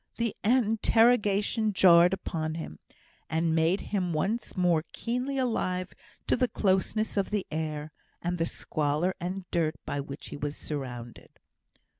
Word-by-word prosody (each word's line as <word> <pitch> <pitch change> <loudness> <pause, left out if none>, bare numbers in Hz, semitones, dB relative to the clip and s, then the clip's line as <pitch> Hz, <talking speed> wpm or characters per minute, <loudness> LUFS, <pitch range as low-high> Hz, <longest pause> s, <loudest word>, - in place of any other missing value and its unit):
The 230 -2 -1
interruption 225 -2 +3
jarred 175 -2 +7
upon 160 -4 -3
him, 120 - -7 0.5
and 160 +1 +1
made 165 +4 +2
him 180 -4 0
once 200 +9 -2
more 175 -3 +3
keenly 250 +4 -2
alive 185 -8 -1 0.3
to - - +2
the 250 +1 +2
closeness 210 +1 0
of 200 - +1
the 210 -2 -1
air, 155 -1 -3 0.3
and 175 0 -2
the 165 - +1
squalor 155 +5 -1
and 185 +1 -4
dirt 165 -2 +1
by 145 - -2
which 140 +1 -7
he - - -6
was 145 0 -4
surrounded. 125 -5 -6
180 Hz, 140 wpm, -28 LUFS, 155-210 Hz, 0.5 s, jarred